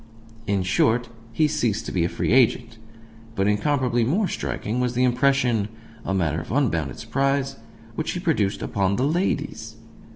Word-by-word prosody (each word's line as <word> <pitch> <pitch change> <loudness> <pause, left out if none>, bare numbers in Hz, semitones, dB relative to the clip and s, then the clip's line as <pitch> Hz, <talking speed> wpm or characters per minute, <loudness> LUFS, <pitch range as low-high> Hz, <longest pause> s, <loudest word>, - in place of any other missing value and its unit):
In 100 -2 +1
short, 110 +6 +2 0.2
he 155 +6 +2
ceased 115 -7 -1
to - - -4
be 90 - +1
a 85 - 0
free - - -2
agent. 115 -2 +2 0.6
But 95 -1 +1
incomparably 120 +2 +1
more 185 - +1
striking 115 -7 -3
was 125 -1 0
the 125 - +2
impression 125 -4 +2 0.4
(a - - -3
matter 80 -4 0
for - - -5
unbounded 80 - 0
surprise!) 135 0 -1 0.4
which 155 - -3
he 180 - -3
produced 145 - 0
upon 100 -1 0
the 125 - +1
ladies. 150 - -1
120 Hz, 160 wpm, -24 LUFS, 100-140 Hz, 0.6 s, short